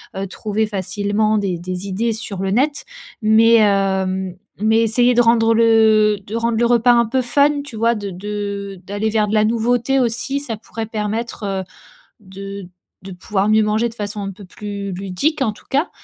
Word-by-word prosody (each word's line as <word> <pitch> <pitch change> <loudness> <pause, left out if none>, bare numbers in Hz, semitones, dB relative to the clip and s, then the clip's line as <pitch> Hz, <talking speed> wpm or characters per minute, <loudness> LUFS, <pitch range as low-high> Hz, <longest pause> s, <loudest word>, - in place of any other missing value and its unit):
heu, 195 +1 -3
trouver 215 +2 -2
facilement 205 +2 -1
des 195 -4 -1
des 185 +2 -5
idées 225 +4 -1
sur 210 -4 -6
le 195 0 -1
net. 280 +7 0 0.4
Mais, 225 +2 +5
hem, 190 -3 +1 0.3
mais 220 +1 +3
essayer 240 +2 +3
de 240 - +4
rendre 230 -1 +4
le 220 -2 +4
de 215 - -6
rendre 230 0 0
le 240 - +2
repas 240 0 +4
un 235 0 +4
peu 260 +4 0
fun, 285 +4 +2
tu 280 -5 -10
vois? 230 +2 +2
De 205 -2 -5
de 200 0 -5
d'aller 205 +2 -1
vers 215 -1 +1
de 210 - -3
la 215 -1 +4
nouveauté 240 +4 +1
aussi, 240 +3 -1
ça 255 -6 -4
pourrait 225 +1 -7
permettre, 220 +1 -4
heu, 195 -1 -2 0.6
de 195 0 -8 0.4
de 190 0 -9
pouvoir 195 +2 -1
mieux 215 0 +4
manger 215 +2 +1
de 230 - -11
façon 205 -1 -5
un 195 0 -4
peu 200 +2 -13
plus 200 +1 -6
ludique 195 - -2
en 225 -5 +1
tout - - -19
cas. 285 +6 +1
215 Hz, 190 wpm, -19 LUFS, 200-230 Hz, 0.6 s, Mais